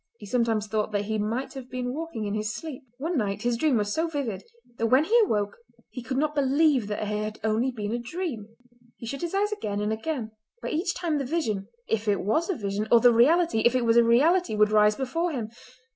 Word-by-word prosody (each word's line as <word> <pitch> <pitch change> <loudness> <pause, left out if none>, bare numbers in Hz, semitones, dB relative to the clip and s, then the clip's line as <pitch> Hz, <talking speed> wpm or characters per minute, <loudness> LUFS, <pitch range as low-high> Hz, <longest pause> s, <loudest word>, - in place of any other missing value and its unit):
He 210 - -11
sometimes 225 -1 0
thought 215 0 -2
that 205 0 0
he 215 +1 -2
might 230 +6 -2
have 260 -2 -9
been 250 0 -3
walking 305 -8 -4
in 205 - -2
his 215 0 -2
sleep. 295 +3 -7 0.2
One 325 +6 -2
night 205 -1 -2
his 240 0 +1
dream 265 +1 +2
was 205 -1 -1
so 325 +1 0
vivid 280 - -3 0.4
that 230 - +2
when 260 +5 +5
he 425 +8 +1
awoke 205 - -1 0.3
he 250 - -6
could 260 +2 -4
not 300 +1 +1
believe 280 -3 +2
that 210 0 -3
it - - -3
had 215 +1 -3
only 220 +4 +1
been 215 -4 -4
a 240 - -1
dream. 245 - -5 0.5
He - - -9
shut 275 +4 -5
his 345 +2 -3
eyes 415 +1 +1
again 210 - -3
and 210 +1 0
again, 225 -1 -4 0.3
but - - -5
each 340 +2 -1
time 325 -4 -1
the - - -1
vision, 235 -10 -2 0.2
if 225 0 -1
it 205 -2 +2
was 270 - 0
a 380 - 0
vision, 205 -1 -3
or 235 - +8
the 245 0 +6
reality, 315 +4 +4
if 240 +3 +3
it 250 -2 +1
was 230 0 +3
a 235 - +7
reality, 285 +5 +3
would 210 0 +3
rise 210 0 +5
before 325 +7 -2
him. 225 -5 -4
235 Hz, 235 wpm, -26 LUFS, 215-300 Hz, 0.5 s, or